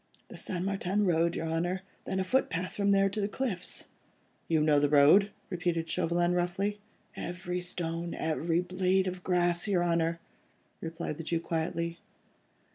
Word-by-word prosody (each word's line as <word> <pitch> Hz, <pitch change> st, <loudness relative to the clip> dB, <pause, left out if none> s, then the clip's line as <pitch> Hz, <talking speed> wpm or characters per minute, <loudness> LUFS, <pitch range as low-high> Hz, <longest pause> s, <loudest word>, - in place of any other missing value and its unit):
"The -, -, -9 dB
St. 180 Hz, 0 st, -3 dB
Martin 195 Hz, +1 st, 0 dB
Road, 170 Hz, -1 st, +2 dB
your 165 Hz, -, -2 dB
Honour, 175 Hz, +3 st, -1 dB, 0.2 s
then 190 Hz, -, -1 dB
a -, -, +2 dB
footpath 185 Hz, -5 st, 0 dB
from 200 Hz, -1 st, +1 dB
there 195 Hz, 0 st, +5 dB
to 200 Hz, +2 st, -2 dB
the 200 Hz, -, +1 dB
cliffs." 205 Hz, -5 st, -2 dB, 0.6 s
"You 160 Hz, -1 st, +3 dB
know 150 Hz, -1 st, +4 dB
the 145 Hz, 0 st, +2 dB
road?" 150 Hz, +8 st, +6 dB, 0.2 s
repeated 170 Hz, -2 st, -1 dB
Chauvelin, 175 Hz, +2 st, +1 dB
roughly. 190 Hz, +4 st, 0 dB, 0.4 s
"Every 180 Hz, 0 st, -4 dB
stone, 170 Hz, -1 st, -3 dB
every 165 Hz, +2 st, 0 dB
blade 185 Hz, +1 st, +1 dB
of 185 Hz, -1 st, -4 dB
grass, 175 Hz, 0 st, +2 dB
your 185 Hz, -4 st, +2 dB
Honour," 170 Hz, -1 st, +1 dB, 0.6 s
replied 165 Hz, -2 st, -4 dB
the 165 Hz, -, -5 dB
Jew 165 Hz, +1 st, 0 dB
quietly. 170 Hz, 0 st, -2 dB
175 Hz, 155 wpm, -30 LUFS, 165-190 Hz, 0.6 s, road